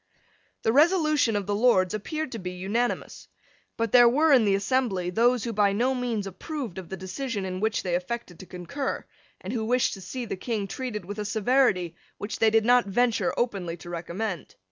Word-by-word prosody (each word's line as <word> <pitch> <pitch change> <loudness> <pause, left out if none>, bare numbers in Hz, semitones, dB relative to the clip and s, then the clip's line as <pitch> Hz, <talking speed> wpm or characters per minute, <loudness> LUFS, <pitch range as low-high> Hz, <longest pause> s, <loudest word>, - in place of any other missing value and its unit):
The 225 - +2
resolution 305 - +3
of 205 -1 -1
the 205 - -1
Lords 205 -5 +3
appeared 305 +7 -4
to 230 - -5
be 180 -1 -5
unanimous. 205 +7 -2 0.5
But 230 -2 -1
there 240 -1 +8
were 300 +5 +4
in 245 -5 +5
the 200 -1 +3
assembly 195 -4 0
those 235 +3 +2
who 230 - -3
by 200 -1 +3
no 245 +6 +1
means 240 -5 -2
approved 210 - -6
of 180 - -10
the 190 - -5
decision 200 +3 -4
in 185 0 -4
which 220 +2 0
they 180 - -2
affected 180 0 -4
to 190 - -11
concur, 185 +11 -4 0.4
and 190 +5 -5
who 230 -3 -1
wished 245 +3 +1
to 195 - -8
see 245 +6 -5
the 220 - -4
King 215 0 -2
treated 215 -5 -5
with 205 +3 -6
a - - -1
severity 210 -5 +2 0.2
which 205 +1 -5
they 225 - +5
did 220 0 +3
not 245 -2 +4
venture 240 +5 +1
openly 195 -8 -2
to 175 +1 -10
recommend. 175 +2 -4
220 Hz, 200 wpm, -26 LUFS, 190-250 Hz, 0.5 s, there